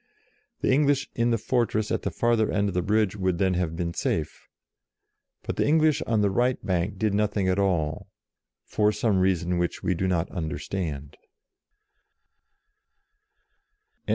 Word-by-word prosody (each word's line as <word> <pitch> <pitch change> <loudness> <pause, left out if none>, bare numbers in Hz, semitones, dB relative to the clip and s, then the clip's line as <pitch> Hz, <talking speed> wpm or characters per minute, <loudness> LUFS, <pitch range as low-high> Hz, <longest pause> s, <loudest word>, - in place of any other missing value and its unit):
The - - +2
English 140 0 +2
in 120 0 +1
the 115 - +2
fortress 110 -2 0
at - - 0
the - - -2
farther 115 -2 +1
end 100 0 +1
of - - -5
the 90 - +1
bridge 105 +1 +1
would 95 -3 -1
then 95 0 +1
have 85 -2 -1
been 85 0 -3
safe. 80 -2 -3 1.0
But - - -4
the - - +1
English 155 0 +3
on 110 -2 +2
the 100 -1 +2
right 125 +5 +1
bank 95 +2 -1
did 105 +1 0
nothing 105 -2 0
at 95 +1 +1
all, 85 -6 0 0.6
for 105 0 +1
some 105 -4 +1
reason 90 -2 +1
which 85 -1 -2
we 95 - +1
do 95 +2 -1
not 90 -1 0
understand. 80 -3 -4
95 Hz, 155 wpm, -26 LUFS, 90-110 Hz, 1.0 s, English